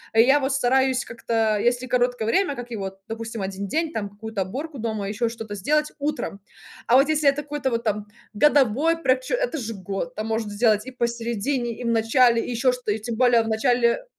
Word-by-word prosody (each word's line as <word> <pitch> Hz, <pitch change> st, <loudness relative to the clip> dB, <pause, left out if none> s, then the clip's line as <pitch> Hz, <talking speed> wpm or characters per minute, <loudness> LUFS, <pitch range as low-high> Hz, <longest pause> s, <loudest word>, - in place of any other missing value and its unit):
Я 255 Hz, +6 st, +6 dB
вот 270 Hz, 0 st, -1 dB
стараюсь 265 Hz, 0 st, +2 dB
как-то 225 Hz, -2 st, 0 dB
если 245 Hz, +3 st, +1 dB
короткое 245 Hz, -2 st, 0 dB
время 285 Hz, -, +1 dB
как 245 Hz, -1 st, -8 dB
его, 195 Hz, -3 st, -5 dB
допустим, 225 Hz, -1 st, -5 dB
1 195 Hz, +1 st, -4 dB
день, 320 Hz, +6 st, -1 dB
там 205 Hz, -2 st, -3 dB
какую-то 210 Hz, 0 st, -5 dB
оборку 275 Hz, -, -5 dB
дома 215 Hz, -3 st, -3 dB
еще 220 Hz, +3 st, -1 dB
что-то 225 Hz, -2 st, -7 dB
сделать, 300 Hz, +10 st, 0 dB
утром. 290 Hz, -8 st, -3 dB, 0.5 s
А 240 Hz, -, +5 dB
вот 275 Hz, +1 st, +5 dB
если 305 Hz, -2 st, +4 dB
это 285 Hz, +2 st, -1 dB
какой-то 290 Hz, -2 st, -2 dB
вот 230 Hz, -1 st, -2 dB
там 210 Hz, -1 st, -2 dB, 0.3 s
годовой 290 Hz, +5 st, +3 dB
прокче 260 Hz, -, +1 dB
это -, -, -2 dB
же 225 Hz, -2 st, -5 dB
год, 190 Hz, -2 st, -5 dB
там 215 Hz, -, -3 dB
можно 225 Hz, -1 st, -2 dB
сделать 215 Hz, +1 st, +2 dB
и -, -, -6 dB
посередине, 235 Hz, 0 st, -2 dB
и -, -, -5 dB
в -, -, -2 dB
начале, 230 Hz, +1 st, +3 dB
и -, -, -6 dB
еще 245 Hz, +1 st, +2 dB
что-то, 250 Hz, -3 st, -3 dB
и 220 Hz, -, -4 dB
тем 225 Hz, +2 st, -4 dB
более 245 Hz, -1 st, +4 dB
в -, -, -6 dB
начале 235 Hz, -, +2 dB
235 Hz, 205 wpm, -24 LUFS, 220-265 Hz, 0.5 s, Я